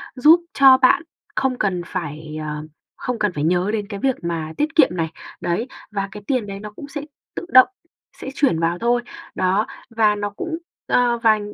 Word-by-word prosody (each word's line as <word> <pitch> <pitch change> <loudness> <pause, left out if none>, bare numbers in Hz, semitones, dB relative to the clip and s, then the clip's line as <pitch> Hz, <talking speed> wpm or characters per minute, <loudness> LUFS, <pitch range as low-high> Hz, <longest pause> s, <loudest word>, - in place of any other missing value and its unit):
giúp 305 +7 +7
cho 270 -1 +7
bạn 255 -1 +4 0.3
không 260 -2 0
cần 185 -4 0
phải 155 -3 -5
ờ, 150 0 -4 0.3
không 250 -2 -3
cần 210 -4 +1
phải 145 - -3
nhớ 180 +4 +2
đến 205 -2 -2
cái 200 -2 -5
việc 265 +1 +1
mà 160 -2 -3
tiết 305 +2 -1
kiệm 300 -5 +6
này, 165 -3 -2 0.3
đấy, 175 +8 -1 0.2
và 200 -1 -2
cái 210 -1 -9
tiền 255 -6 0
đấy 195 0 -6
nó 210 0 -8
cũng 285 - -9
sẽ 290 0 -5 0.3
tự - - -4
động 255 0 +9 0.5
sẽ - - -5
chuyển 255 - +2
vào 170 +1 0
thôi. 240 +1 +2 0.3
Đó, 190 +3 +1 0.2
và 220 -2 +3
nó 205 0 -2
cũng 325 - -5 0.3
ơ, 240 -1 +3
và 220 -1 +5
210 Hz, 200 wpm, -21 LUFS, 175-255 Hz, 0.5 s, động